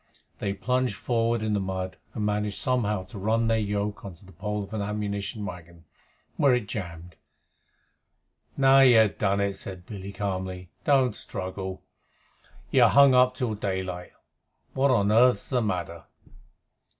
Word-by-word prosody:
They 100 Hz, 0 st, -2 dB
plunged 125 Hz, +1 st, 0 dB
forward 115 Hz, 0 st, 0 dB
in 110 Hz, -1 st, 0 dB
the 105 Hz, -, +1 dB
mud, 95 Hz, -1 st, -4 dB, 0.2 s
and 105 Hz, -, -2 dB
managed 105 Hz, -1 st, -1 dB
somehow 105 Hz, -7 st, 0 dB
to 95 Hz, +2 st, -9 dB
run 110 Hz, +3 st, +1 dB
their 115 Hz, 0 st, +2 dB
yoke 105 Hz, 0 st, -2 dB
on 95 Hz, -4 st, -8 dB
the 95 Hz, +3 st, -16 dB
pole 105 Hz, +4 st, -4 dB
of 100 Hz, +2 st, -11 dB
an 110 Hz, -, -2 dB
ammunition 105 Hz, +1 st, -3 dB
wagon, 85 Hz, -2 st, -10 dB, 0.5 s
where 140 Hz, -3 st, +4 dB
it 120 Hz, -4 st, -2 dB
jammed. 90 Hz, -4 st, -7 dB, 1.4 s
"Now 135 Hz, 0 st, +6 dB
you 130 Hz, -3 st, +7 dB
have 110 Hz, -2 st, +3 dB
done 100 Hz, -1 st, +1 dB
it," 100 Hz, -1 st, -1 dB
said 90 Hz, -3 st, -9 dB
Billy 100 Hz, -1 st, -7 dB
calmly. 95 Hz, -2 st, -4 dB
"Don't 130 Hz, -6 st, +3 dB
struggle. 95 Hz, 0 st, -6 dB, 0.9 s
You're -, -, +6 dB
hung 140 Hz, -1 st, +6 dB
up 125 Hz, 0 st, +4 dB
till 125 Hz, -3 st, -2 dB
daylight. 95 Hz, -3 st, -4 dB, 0.6 s
What 135 Hz, +1 st, +2 dB
on 105 Hz, -5 st, +3 dB
earth's 125 Hz, +3 st, +4 dB
the 125 Hz, -2 st, +1 dB
matter?" 90 Hz, -5 st, -3 dB
105 Hz, 150 wpm, -26 LUFS, 95-115 Hz, 1.4 s, you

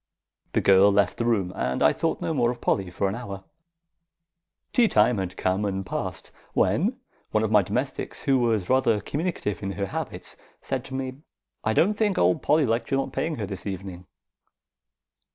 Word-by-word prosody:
The -, -, +2 dB
girl 100 Hz, +1 st, +6 dB
left 100 Hz, -2 st, +2 dB
the 115 Hz, -, -1 dB
room, 100 Hz, -6 st, +1 dB
and 65 Hz, -, -1 dB
I 75 Hz, -, +5 dB
thought 165 Hz, -, -1 dB
no 165 Hz, -, -1 dB
more 120 Hz, -5 st, +2 dB
of 120 Hz, 0 st, -4 dB
Polly 95 Hz, -5 st, 0 dB
for 95 Hz, +2 st, -1 dB
an 95 Hz, -, -2 dB
hour. 100 Hz, -5 st, -6 dB, 1.3 s
Tea 240 Hz, -2 st, +5 dB
time 110 Hz, -, +3 dB
had 95 Hz, -1 st, -4 dB
come 95 Hz, +2 st, 0 dB
and 95 Hz, -1 st, -2 dB
passed, -, -, -4 dB, 0.2 s
when -, -, +2 dB, 0.3 s
one 110 Hz, -, +1 dB
of 110 Hz, -, -1 dB
my 105 Hz, -2 st, +6 dB
domestics, 125 Hz, +9 st, -3 dB
who 135 Hz, -2 st, +3 dB
was 115 Hz, -6 st, +1 dB
rather 125 Hz, -4 st, +3 dB
communicative 140 Hz, -, -3 dB
in 100 Hz, 0 st, -3 dB
her 100 Hz, -, -2 dB
habits, 95 Hz, -, -6 dB, 0.2 s
said -, -, -3 dB
to 130 Hz, -, -7 dB
me: 130 Hz, -1 st, -4 dB, 0.5 s
"I 110 Hz, -, +1 dB
don't 195 Hz, -, +3 dB
think 210 Hz, -2 st, 0 dB
old 90 Hz, +1 st, +3 dB
Polly 150 Hz, 0 st, +3 dB
liked 115 Hz, 0 st, -1 dB
your 135 Hz, -, +2 dB
not -, -, -6 dB
paying 160 Hz, -1 st, -1 dB
her 110 Hz, -, -3 dB
this 95 Hz, 0 st, -6 dB
evening." 95 Hz, -2 st, -6 dB
105 Hz, 190 wpm, -25 LUFS, 95-130 Hz, 1.3 s, girl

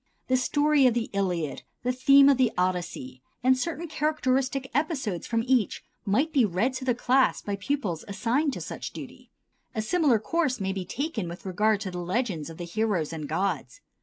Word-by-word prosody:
The 260 Hz, -, +4 dB
story 290 Hz, +2 st, +3 dB
of 240 Hz, -, +2 dB
the 235 Hz, -1 st, -2 dB
"Iliad," 175 Hz, -8 st, -1 dB, 0.2 s
the 250 Hz, -, +1 dB
theme 275 Hz, +2 st, +6 dB
of 280 Hz, -2 st, +5 dB
the 255 Hz, -3 st, +3 dB
"Odyssey," 175 Hz, -8 st, -2 dB, 0.2 s
and 260 Hz, +1 st, +5 dB
certain 335 Hz, +5 st, -3 dB
characteristic 270 Hz, -4 st, 0 dB
episodes 270 Hz, -, -1 dB
from 230 Hz, -1 st, 0 dB
each 255 Hz, -5 st, +1 dB, 0.2 s
might 265 Hz, +11 st, +1 dB
be 270 Hz, -5 st, +4 dB
read 210 Hz, +6 st, +1 dB
to 260 Hz, -, -7 dB
the 250 Hz, -2 st, +2 dB
class 255 Hz, +2 st, +2 dB
by 205 Hz, -, -2 dB
pupils 200 Hz, -, -2 dB
assigned 255 Hz, +8 st, 0 dB
to -, -, -5 dB
such -, -, -6 dB
duty. -, -, -10 dB, 0.5 s
A 220 Hz, -, 0 dB
similar 290 Hz, -1 st, +3 dB
course 270 Hz, +2 st, 0 dB
may 190 Hz, -1 st, -1 dB
be 190 Hz, -2 st, -4 dB
taken 240 Hz, -, -3 dB
with 170 Hz, +3 st, -9 dB
regard 210 Hz, +3 st, +1 dB
to 190 Hz, -3 st, -4 dB
the 180 Hz, -, -5 dB
legends 180 Hz, -, -2 dB
of 165 Hz, -, -10 dB
the 175 Hz, -, -5 dB
heroes 180 Hz, -4 st, -1 dB
and 155 Hz, -3 st, -5 dB
gods. 160 Hz, -7 st, -2 dB
230 Hz, 190 wpm, -27 LUFS, 185-270 Hz, 0.5 s, theme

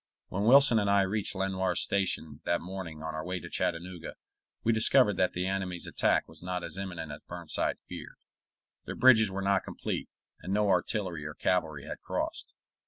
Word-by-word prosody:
When 100 Hz, +3 st, -1 dB
Wilson 130 Hz, -1 st, +7 dB
and 100 Hz, -1 st, +1 dB
I 100 Hz, 0 st, +5 dB
reached 100 Hz, +1 st, 0 dB
Lenoir's 95 Hz, -2 st, 0 dB
Station 80 Hz, -6 st, -1 dB
that 85 Hz, -, +1 dB
morning 90 Hz, -4 st, -7 dB
on 80 Hz, 0 st, -4 dB
our 80 Hz, 0 st, -4 dB
way 90 Hz, +1 st, -3 dB
to -, -, -10 dB
Chattanooga, 85 Hz, 0 st, -3 dB, 0.5 s
we 115 Hz, -, +3 dB
discovered 110 Hz, -1 st, +5 dB
that 90 Hz, -, +2 dB
the 90 Hz, +1 st, -2 dB
enemy's 95 Hz, -2 st, -2 dB
attack -, -, +1 dB
was -, -, -12 dB
not 90 Hz, 0 st, -3 dB
as -, -, -6 dB
imminent 90 Hz, -5 st, -5 dB
as 75 Hz, -, -8 dB
Burnside 85 Hz, -2 st, -2 dB
feared. -, -, -9 dB, 0.7 s
Their -, -, -5 dB
bridges 110 Hz, -5 st, +6 dB
were 95 Hz, 0 st, -4 dB
not 100 Hz, -1 st, +2 dB
complete, -, -, -4 dB, 0.3 s
and 95 Hz, -, -5 dB
no 105 Hz, 0 st, +2 dB
artillery 90 Hz, -3 st, 0 dB
or 75 Hz, 0 st, -6 dB
cavalry 80 Hz, -6 st, 0 dB
had -, -, -7 dB
crossed. -, -, -4 dB
95 Hz, 180 wpm, -30 LUFS, 85-100 Hz, 0.7 s, Wilson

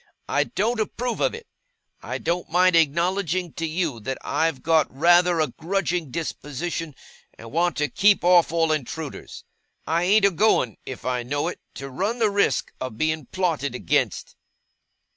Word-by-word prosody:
I -, -, +1 dB
don't 225 Hz, +4 st, -1 dB
approve 235 Hz, +2 st, -2 dB
of -, -, +1 dB
it. 465 Hz, 0 st, -10 dB, 0.6 s
I -, -, -4 dB
don't 175 Hz, +1 st, -2 dB
mind 180 Hz, +2 st, +4 dB
acknowledging 170 Hz, +2 st, +1 dB
to 165 Hz, -, -3 dB
you 160 Hz, -6 st, -2 dB
that 130 Hz, +5 st, -4 dB
I've 160 Hz, -5 st, -1 dB
got 160 Hz, -1 st, +3 dB
rather 175 Hz, +4 st, +4 dB
a 155 Hz, -3 st, +1 dB
grudging 175 Hz, +1 st, -2 dB
disposition, 160 Hz, +1 st, -4 dB, 0.4 s
and 115 Hz, 0 st, -11 dB
want 170 Hz, +2 st, +1 dB
to 150 Hz, -1 st, +1 dB
keep 200 Hz, +3 st, +3 dB
off 175 Hz, -2 st, +5 dB
all 165 Hz, -1 st, +2 dB
intruders. 155 Hz, +1 st, -5 dB, 0.4 s
I 165 Hz, +2 st, +1 dB
ain't 200 Hz, +2 st, +4 dB
a 200 Hz, -, +5 dB
going, 165 Hz, -, +2 dB
if 130 Hz, -, -7 dB
I 125 Hz, -1 st, 0 dB
know 145 Hz, +7 st, -2 dB
it, -, -, -8 dB, 0.2 s
to 135 Hz, -, -6 dB
run 195 Hz, -, -2 dB
the 220 Hz, -3 st, +2 dB
risk 200 Hz, -10 st, +1 dB
of 130 Hz, -4 st, -5 dB
being 155 Hz, -1 st, -1 dB
plotted 160 Hz, -8 st, -1 dB
against. -, -, -1 dB
165 Hz, 160 wpm, -24 LUFS, 145-185 Hz, 0.6 s, off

